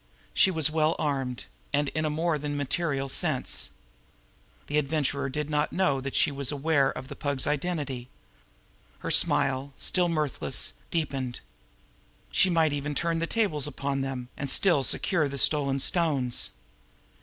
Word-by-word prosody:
She 190 - +5
was 160 -4 +2
well 155 +1 +2
armed 135 -5 -2 0.3
and 145 0 +1
in 155 +1 -1
more 160 0 0
than 145 0 -3
a - - -3
material 145 0 -1
sense. 135 - 0 1.0
The 150 +1 +1
Adventurer 140 -1 0
did 150 +2 -3
not 150 0 0
know 145 -8 +1
that 135 0 -5
she - - +3
was 140 -1 0
aware 145 -1 +2
of 130 - -6
the 140 - -8
Pug's 140 -2 0
identity. 145 -5 -2 0.9
Her - - -3
smile, 135 +1 +3
still 180 -1 +2
mirthless, 155 -5 -1 0.2
deepened. 135 -6 -2 0.9
She 190 - +4
might 160 -4 +2
even 145 0 -3
turn 170 +1 0
the 165 - -1
tables 165 - 0
upon 140 -1 -2
them, 130 -2 -4
and 140 - -4
still 165 -3 +4
secure 155 +3 +1
the 140 - -5
stolen 140 -1 +3
stones. 140 -5 +1
145 Hz, 150 wpm, -27 LUFS, 135-160 Hz, 1.0 s, She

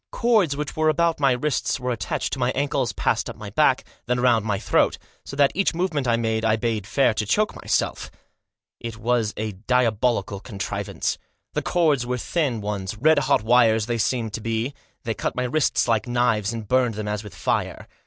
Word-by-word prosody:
Cords 210 -12 +2
which 150 -1 -4
were 155 0 +2
about 165 +1 +1
my 140 -2 +4
wrists 135 +1 -1
were 125 0 -2
attached 105 -7 -3
to 135 - -3
my 125 0 +1
ankles, 140 -4 0
passed - - -1
up - - -7
my - - -9
back, - - +3 0.2
then 125 0 +1
round 120 -3 +3
my 105 -2 -1
throat, 105 - +2 0.3
so - - -8
that 140 -1 +4
each 195 -2 +1
movement 165 -7 -1
I 120 - +3
made 110 -1 -1
I 110 -1 +3
bade 110 -3 -2
fair 135 -5 +3
to 110 - -1
choke 210 - +1
myself. - - -1 0.7
It 115 -1 -6
was 115 -1 0
a 110 0 -2
diabolical 110 -1 0
contrivance. 100 -3 -4 0.3
The - - 0
cords 155 -7 +2
were 125 +1 -2
thin 130 -4 -1
ones 100 -1 -4
— - - -15
red 155 +3 +5
hot 135 - +2
wires 115 -2 +4
they 120 0 -2
seemed 110 -1 -1
to 115 - -4
me 115 +2 -1
to - - -13
be, - - -29 0.3
they - - -1
cut - - -3
my 125 - -1
wrists 135 +3 +1
like 115 0 +1
knives, 120 -4 +1
and 115 -2 -6
burned 125 -2 +2
them 105 0 -4
as 105 0 -2
with 105 - -11
fire. - - -2
120 Hz, 210 wpm, -23 LUFS, 110-140 Hz, 0.7 s, red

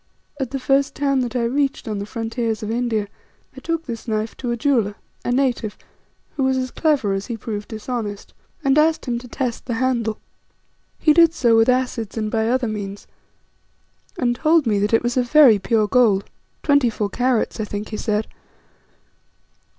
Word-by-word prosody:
At 265 -3 -2
the 270 - -3
first 270 +1 +1
town 275 -2 +1
that 250 -1 -2
I 245 - +1
reached 270 +3 -1
on 210 -2 -3
the 200 - -5
frontiers 225 -1 -3
of 215 - -3
India, 230 -3 -1 0.5
I - - -8
took 330 -1 -3
this 235 -1 -6
knife 215 0 -2
to 245 - -4
a 235 - -1
jeweller, 225 -6 +1 0.3
a - - -1
native, 245 -5 0 0.6
who 280 - 0
was 265 0 +2
as 255 -1 -2
clever 290 -11 +1
as 195 +1 -3
he 235 - -4
proved 210 -1 -5
dishonest, 220 -2 -5 0.3
and 275 +2 +4
asked 315 +1 +2
him 240 -2 -1
to 245 - -11
test 245 -1 -4
the 240 - -1
handle. 235 -3 0 0.8
He 305 - +4
did 335 0 +5
so 235 -6 +3
with 225 +2 +4
acids 250 -4 -1
and 215 -1 -2
by 220 0 +1
other 255 0 +1
means, 205 -2 -5 1.1
and 240 -5 +1
told 315 0 +3
me 210 -3 +2
that 205 +1 0
it 225 - +3
was 240 +1 -1
of 245 -1 +1
very 265 -9 +7
pure 215 +1 +1
gold, 210 -4 +3 0.4
twenty 285 -5 +4
four 210 -2 -2
carats, 250 -2 0
I 215 - -1
think 205 0 -5
he 215 - -4
said. 210 0 -1
235 Hz, 190 wpm, -21 LUFS, 215-260 Hz, 1.1 s, very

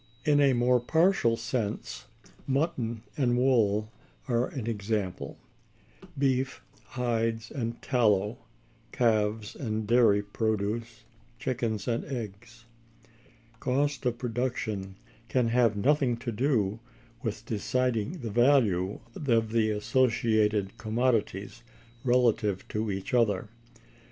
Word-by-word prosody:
In 145 -1 +4
a 140 -2 +5
more 125 +1 +3
partial 160 -3 +3
sense, 115 -2 -3 0.4
mutton 130 -6 -1
and 120 -4 +2
wool 110 -4 +2 0.4
are 120 -1 +1
an 130 -6 -6
example; 105 -4 -3 0.8
beef, 130 -1 0 0.2
hides, 115 -2 -1
and 115 -4 -3
tallow; 105 -3 +2 0.5
calves 110 -2 +1
and 110 -4 -3
dairy 115 -3 +4
produce; 110 +2 -2 0.3
chickens 115 -5 -2
and 120 -1 0
eggs. 115 -2 -7 0.9
Cost 140 +3 0
of 120 -1 -1
production 115 -5 -3 0.3
can 125 -3 +2
have 115 -3 +3
nothing 130 +1 +2
to 120 0 -4
do 115 -4 0 0.4
with 110 -3 -4
deciding 125 - -1
the 115 -3 -4
value 110 -7 +3
of 115 -6 +1
the 110 -1 +2
associated 110 -3 +1
commodities 115 -2 -1 0.4
relatively 120 -6 +2
to 110 0 -2
each 95 +2 -4
other. 105 -5 +2
115 Hz, 105 wpm, -28 LUFS, 105-125 Hz, 0.9 s, a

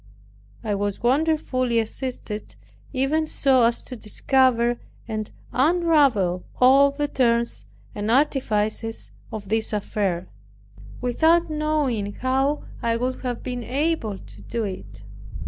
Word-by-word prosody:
I 215 - -1
was 205 +1 -2
wonderfully 255 -3 +1
assisted 220 - -4 0.4
even 300 +5 +1
so 265 -4 +3
as 235 0 +2
to 255 - -6
discover 240 +1 +2 0.3
and 215 -2 -3 0.2
unravel 275 - +3 0.2
all 270 +2 +7
the 290 +1 -2
turns 235 - 0 0.3
and 205 +1 -3
artifices 225 -4 0 0.2
of 205 -3 -7
this 220 +1 0
affair, 195 -4 -1 0.7
without 320 +7 +3
knowing 295 -9 0
how 270 +5 0 0.2
I 230 0 +1
could 255 +2 -2
have 245 -2 -4
been 245 -1 -4
able 270 -6 -1
to - - -14
do 230 -1 -3
it. 105 - -7
245 Hz, 115 wpm, -24 LUFS, 215-275 Hz, 0.7 s, all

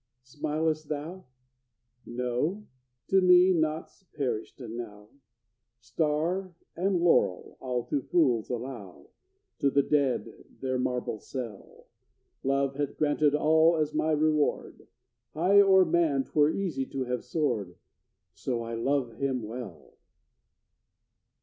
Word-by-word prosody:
Smil'st 155 +3 -2
thou? 155 +5 -5 0.8
No? 125 - -2 0.4
to 190 0 +4
me 180 0 +6
naught's 155 +2 -2
perished 130 -6 -3
now! 110 -4 -8 0.7
Star 160 - -1 0.2
and 185 +2 +1
laurel 170 - +2
I'll 125 -2 -2
to 140 - -2
fools 125 -9 +1
allow, 120 -6 -7 0.5
To 140 - +3
the 140 +1 +3
dead 140 -4 0 0.2
their 130 -1 -2
marble 125 -3 -2
cell; 115 -6 -8 0.6
Love 135 0 0
hath 145 -1 -3
granted 150 -1 +2
all 160 +2 +4
as 155 -1 -1
my 160 - 0
reward, 155 -1 0 0.5
High 190 +6 +5
o'er 190 -2 +6
man 160 -5 +2
'twere 150 +1 +2
easy 160 -8 -2
to 135 -1 -3
have 125 -1 -3
soared, 120 - -2 0.6
So 120 -3 -3
I 115 0 -6
love 120 -1 -1
him 130 -3 -1
well! 110 -5 -8
140 Hz, 115 wpm, -28 LUFS, 125-160 Hz, 0.8 s, me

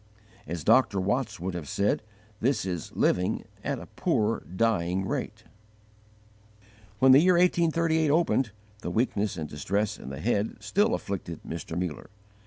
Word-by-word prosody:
As 85 0 -4
Dr. 115 -3 +4
Watts 105 +5 -1
would 90 +2 -3
have 85 -5 -6
said, 100 +1 +1 0.4
this 120 -4 +1
is 90 -4 -4
living 90 0 +1 0.2
"at - - -1
a - - -8
poor 110 +1 0 0.2
dying 95 -3 +1
rate." - - -4 1.5
When 130 +5 +6
the 130 - +9
year 180 +2 +5
1838 165 -2 +3
opened, 145 -6 +2 0.3
the 90 - -4
weakness 105 -1 0
and 80 -2 -4
distress 100 +9 -2
in - - -8
the 70 - -6
head 105 -1 0
still 210 +5 +2
afflicted 85 -4 -5
Mr. 85 0 -5
Muller. 90 -5 -4
105 Hz, 145 wpm, -27 LUFS, 90-135 Hz, 1.5 s, the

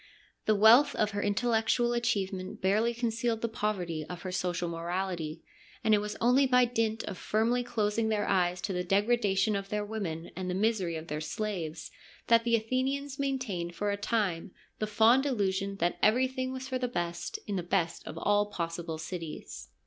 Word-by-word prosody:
The 215 - +4
wealth 235 +8 +7
of 215 0 +1
her 205 0 -2
intellectual 230 +3 +1
achieve 235 -5 0
ment 185 0 -6
barely 215 +5 +2
concealed 230 -1 -1
the 230 - 0
poverty 190 -8 -2
of 180 -1 -7
her 185 - -4
social 180 -1 -1
morality, 170 -1 -3 0.4
and 220 - +4
it 210 - +5
was 210 0 -4
only 255 +3 +4
by 250 -1 +5
dint 225 -2 -1
of 185 - -6
firmly 230 +3 +1
closing 220 -2 0
their 210 -2 0
eyes 180 -2 +1
to 190 - -2
the 180 0 -1
degradation 200 +1 +2
of 195 0 -4
their 210 0 -1
women 180 -7 -4
and 185 0 -4
the 180 - -1
misery 195 -4 +1
of 160 0 -5
their 150 -2 -4
slaves 165 -2 -4 0.4
that 230 0 +6
the 235 -1 +4
Athenians 265 +5 -1
main 275 -1 0
tained 175 -9 -4
for 205 +2 -1
a - - 0
time 200 -4 -1 0.3
the 215 - -1
fond 230 +6 +4
illusion 200 -5 0
that 175 -2 -1
every 245 +5 +4
thing 260 0 -3
was 260 0 -5
for 260 -1 -2
the 250 - 0
best 175 -7 -3
in 205 - -3
the 185 - 0
best 175 -1 -1
of 160 - -7
all 205 +3 +2
possible 170 -3 -4
cities. 165 0 -7
205 Hz, 190 wpm, -30 LUFS, 180-235 Hz, 0.4 s, wealth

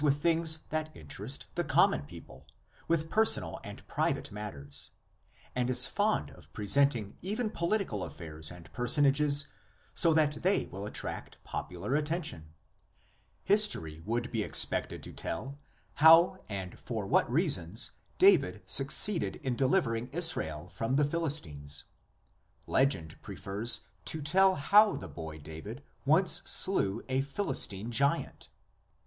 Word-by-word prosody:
5 - - -5
with 145 -1 +2
things 160 0 +1
that 155 0 -3
interest 75 -2 -3
the - - -2
common 70 - +2
people, 70 -1 -14 0.4
with 165 -1 0
personal 220 +1 +3
and - - -11
private - - -2
matters, 70 -10 -4 0.6
and 125 0 -1
is 125 0 +4
fond 210 +1 -1
of - - -18
present 140 +7 +2
ing 105 -3 -8
even 210 +4 -3
political 170 - -2
affairs 80 -2 -6
and 85 -2 -13
personages 140 +3 +3 0.5
so 165 - +5
that 150 -2 +1
they 190 +3 +1
will 100 +2 -8
attract - - -7
popular 90 +8 -6
attention. 150 - -3 0.9
History 195 - +3
would 120 +5 -3
be 115 - -2
expected - - +1
to - - -9
tell 135 +11 -6 0.3
how 165 +4 +6
and 95 -3 -7
for 110 -4 -5
what 100 - +1
reasons 120 - +1 0.3
David 150 - +3
succeeded 140 - +6
in 130 -3 -2
delivering 125 -4 0
Israel 125 - 0
from 115 +8 -3
the 145 +1 +2
Philistines; 135 - -3 0.8
legend 90 - -1
prefers 110 +5 -2 0.2
to 160 - -3
tell 190 +5 +3
how 205 +9 +4
the 95 - -8
boy 80 +1 -9
David 80 - -10 0.2
once 165 +6 +3
slew 115 - +4
a 130 0 0
Philistine 120 - -2
giant. 140 +5 -1
130 Hz, 130 wpm, -30 LUFS, 95-160 Hz, 0.9 s, how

